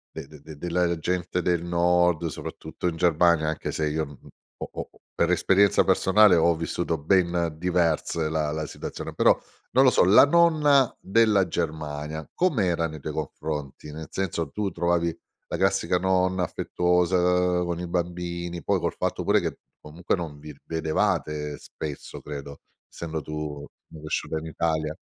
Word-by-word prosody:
de 70 - -7
de 75 -2 -14
de 75 0 -11
della 85 +1 0
gente 90 +1 -1
del 85 -1 0
Nord, 85 -1 +2
soprattutto 80 - -6
in 85 - -1
Germania, 85 -2 +3
anche 80 - -3
se 75 -1 -1
io 80 +1 -1
n 70 -2 -13 0.4
ho - - -5
ho - - -6 0.3
per 85 +1 +2
esperienza 95 +2 +4
personale, 100 0 +5
ho 85 0 +3
vissuto 85 0 -2
ben 85 +1 +1
diverse 85 -2 0
la 75 -2 -1
la 80 0 -3
situazione, - - -7
però, - - +4 0.3
non 130 +2 +5
lo 130 - +7
so, - - +4
la 100 +8 +8
nonna 150 -4 +4
della 105 -1 +3
Germania, 75 -1 -4
com’era 95 - +1
nei 80 -1 -8
tuoi - - -5
confronti? 75 -1 -5
Nel 80 +1 -8
senso, 85 -5 -2
tu 100 0 -2
trovavi 85 -1 0 0.3
la - - -2
classica 95 -2 +2
nonna 95 0 +1
affettuosa 90 +1 +1 0.5
con 85 -1 -3
i 90 - -4
bambini? 85 -1 -3
Poi, - - +1
col - - -2
fatto - - -2
pure - - +3
che - - -4 0.2
comunque 85 +6 -2
non 80 -5 -6
vi 75 -1 -10
vedevate 75 -2 -1
spesso, 75 -2 -8
credo, 70 -1 -8 0.3
essendo 80 -2 -5
tu 75 -1 -5 0.3
cresciuta 80 0 -4
in 80 - -9
Italia. 80 -1 -1
85 Hz, 155 wpm, -25 LUFS, 75-90 Hz, 0.5 s, la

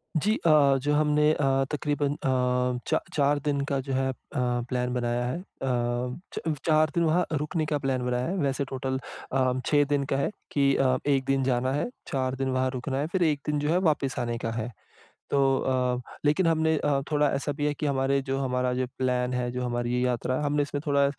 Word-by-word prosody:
जी, 205 +7 +2
अ, 145 -4 +5
जो 145 +2 +1
हमने 150 0 +3
अ, 135 -2 +2
तक़रीबन 145 -1 0
अ, 125 -2 0
चा - - +2
चार 145 0 +2
दिन 145 -1 +1
का 140 - +1
जो 135 - -1
है 130 0 +1
अ, - - -2 0.2
प्लान 125 0 -1
बनाया 120 0 -1
है। 125 +6 -2
अ, - - -10 0.9
च - - -3 0.3
चार 155 -1 +4
दिन 170 - +3
वहाँ 170 +2 +2
रुकने 155 +2 -1
का 150 -1 0
प्लान 130 -2 -1
बनाया 125 0 0
है, 185 - -2
वैसे 140 -4 0
टोटल 130 0 -2 0.3
अ, 130 -1 +2
6 145 -1 +4
दिन 145 -1 +2
का - - +1
है 140 - +1 0.2
कि 140 -1 +3
अ, 130 -1 +3
1 135 -2 +2
दिन 135 0 +1
जाना 130 0 +1
है, 145 - -1 0.2
4 130 -3 -1
दिन 135 0 -2
वहाँ 130 0 +1
रुकना 130 +1 -3
है, 145 - -1
फिर 185 -1 +1
1 150 -3 +2
दिन 150 -1 0
जो 150 +1 -1
है 170 - +3
वापिस 135 -4 -1
आने 120 -1 -2
का 115 - -1
है। 115 +1 -3 0.6
तो 140 - +2 0.2
अ, 125 -1 0 0.2
लेकिन 160 +5 +3
हमने 160 -1 +2
अ, 145 -2 +1
थोड़ा 150 -1 +3
ऐसा 140 +1 -1
भी 145 +1 -2
है 150 - +1
कि 150 - -4
हमारे 135 -1 +1
जो 135 0 -2
हमारा 125 -1 0
जो 130 +1 0
प्लान 125 -1 0
है, 125 -1 -1
जो 125 0 -3
हमारी 120 0 -1
ये 125 - +1
यात्रा 125 +1 0
है 150 - -2
हमने 145 0 +1
इसमें 145 0 -4
थोड़ा 140 -1 +4
135 Hz, 220 wpm, -27 LUFS, 125-150 Hz, 0.9 s, अ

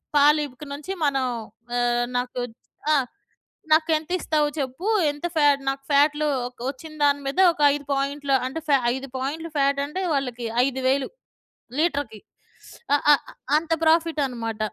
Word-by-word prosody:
పాలు 295 +1 +6
ఇక 280 +3 -12
నుంచి 295 +6 -6
మనం 270 -2 +1 0.5
ఆహ్, 240 0 +1
నాకు 250 0 -3 0.5
ఆ! - - +5 0.8
నాకెంతిస్తావు 315 -1 +2
చెప్పు? 270 +8 -4 0.2
ఎంత 290 +3 -7
ఫాటు 290 -2 +4
నాకు 270 0 -4
ఫాటులు 295 +1 +3 0.2
ఒక్ 250 -1 -14
ఒచ్చిన 295 +4 -9
దాని 285 0 +3
మీద 280 +7 -2
ఒక 300 - -7
5 285 -1 -7
పాయింట్‌లు" 275 0 0
అంటే 295 +5 -4
ఫా 280 - +6 0.2
5 270 +1 -7
పాయింట్‌లు 305 +6 -4
ఫాటంటే 280 +5 0
వాళ్ళకి 250 -4 -2 0.2
5 265 -1 -3
వేలు 270 +1 +1 0.7
లీటర్‌కి. 285 - -1 0.5
స్ - - -14 0.2
ఆ - - +5
ఆ - - +10 0.4
అంత 325 +1 -4
ప్రాఫిటనమాట. 285 -9 +1
285 Hz, 140 wpm, -24 LUFS, 265-305 Hz, 0.8 s, ఆ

